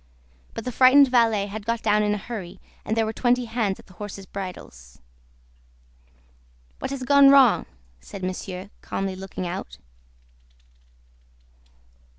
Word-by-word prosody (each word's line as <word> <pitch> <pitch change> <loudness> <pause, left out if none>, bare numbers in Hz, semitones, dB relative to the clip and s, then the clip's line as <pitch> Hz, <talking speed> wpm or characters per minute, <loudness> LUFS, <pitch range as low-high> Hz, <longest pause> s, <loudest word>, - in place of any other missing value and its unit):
But 225 - -6
the 250 - -3
frightened 265 +3 +6
valet 225 -5 +3
had 205 +1 -7
got 230 +1 -2
down 210 -1 +3
in 210 0 +1
a - - -3
hurry, 200 -4 -8 0.2
and 220 - -2
there 225 - +2
were 220 - -3
twenty 245 +1 +1
hands 225 -4 -2
at - - -16
the 185 - -18
horses' 200 0 -8
bridles. 180 - -9 1.8
"What - - -4
has 275 -1 -5
gone 280 +1 +6
wrong?" 270 -5 +5 0.3
said 185 - -10
Monsieur, 185 +1 -5
calmly 195 -1 -4
looking 190 -1 -6
out. 180 +2 -6
210 Hz, 140 wpm, -24 LUFS, 190-245 Hz, 1.8 s, frightened